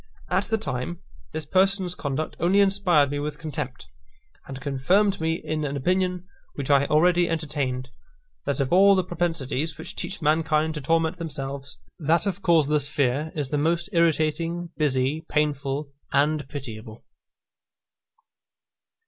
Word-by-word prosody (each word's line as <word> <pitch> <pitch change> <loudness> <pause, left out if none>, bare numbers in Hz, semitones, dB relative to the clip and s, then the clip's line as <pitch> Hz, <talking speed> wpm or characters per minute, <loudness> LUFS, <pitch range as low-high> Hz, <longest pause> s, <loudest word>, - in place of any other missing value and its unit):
At - - +2
the 225 - 0
time, 175 - -4 0.3
this 155 -1 -4
person's 190 +2 +2
conduct 145 -2 -3
only 180 +4 +3
inspired 190 -8 +3
me 145 - -2
with 150 0 -4
contempt, 135 - -5 0.6
and 135 -1 -7
confirmed 170 +9 +1
me 160 0 +1
in 155 -2 -3
an 145 -1 -2
opinion 180 +4 0 0.3
which 140 0 -2
I 140 0 +4
already 175 +3 +3
entertained, 140 -6 -2 0.6
that 140 +1 0
of 135 +3 0
all 195 +2 +7
the 185 - +2
propensities 160 -4 -2
which - - -7
teach 200 - -4
mankind 155 0 +2
to 150 - -5
torment 165 +4 +1
themselves, 140 -3 -5 0.2
that 165 +4 +2
of 200 -1 -2
causeless 150 -5 +3
fear 145 +2 0
is 145 -4 -2
the 150 - 0
most 170 +4 0
irritating, 165 +1 +1
busy, 145 +1 +1
painful, 145 -1 -1 0.2
and 145 0 +1
pitiable. 115 -6 -8
155 Hz, 140 wpm, -25 LUFS, 140-170 Hz, 0.6 s, all